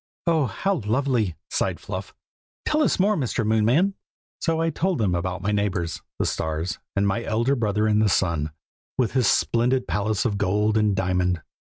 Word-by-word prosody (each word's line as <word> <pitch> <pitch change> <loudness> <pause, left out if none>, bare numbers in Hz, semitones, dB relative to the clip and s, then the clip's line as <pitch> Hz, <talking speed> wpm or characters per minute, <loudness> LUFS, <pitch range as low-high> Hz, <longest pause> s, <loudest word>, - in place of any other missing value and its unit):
"Oh, 160 -5 +2
how 190 - -1
lovely!" 115 - +1 0.2
sighed - - 0
Fluff. - - -6 0.5
"Tell 305 0 +2
us 300 - +2
more, 205 +3 +3
Mr. 125 - -1
Moonman!" 115 - +3 0.5
So 165 -1 0
I 165 0 +1
told 180 +3 0
them 100 -5 +1
about 90 +1 -2
my 105 - +1
neighbors, 95 -6 -1 0.2
the - - 0
stars, 80 +3 -2 0.2
and 100 0 +2
my 100 +4 0
elder 115 +5 +1
brother 105 -3 +1
in 105 0 +3
the 110 -1 +3
Sun, 85 -5 +1 0.5
with 125 -4 +1
his 130 -3 +2
splendid 125 +2 +2
palace 105 +1 0
of 100 -4 0
gold 105 +2 +1
and 105 -2 +3
diamond. 90 -2 0
110 Hz, 175 wpm, -24 LUFS, 95-130 Hz, 0.5 s, more